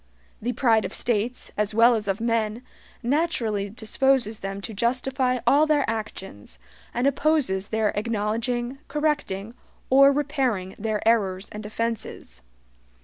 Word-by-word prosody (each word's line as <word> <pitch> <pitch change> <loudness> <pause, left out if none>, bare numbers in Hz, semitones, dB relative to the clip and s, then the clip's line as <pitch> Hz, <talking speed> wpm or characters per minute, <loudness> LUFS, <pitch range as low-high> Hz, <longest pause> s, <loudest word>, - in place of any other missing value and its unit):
The 245 +3 -1
pride 225 -5 +3
of 185 - -4
states, 240 +1 -1
as 210 0 -1
well 235 +2 +6
as 215 -3 -2
of 195 +1 0
men, 230 0 -1 0.4
naturally 235 -8 0
disposes 235 +1 +1
them 195 0 -5
to 220 - -6
justify 255 +3 0
all 290 +5 +5
their 300 -2 +2
actions, 195 - -6 0.3
and 245 +2 -1
opposes 280 -9 +2
their 220 -1 +1
acknowledging, 230 +4 -2
correcting, 275 -9 -1 0.4
or 275 +1 +7
repairing 265 -10 -1
their 215 0 -2
errors 195 -4 +1
and 210 +1 -7
offenses. 215 - -4
230 Hz, 130 wpm, -25 LUFS, 210-260 Hz, 0.4 s, or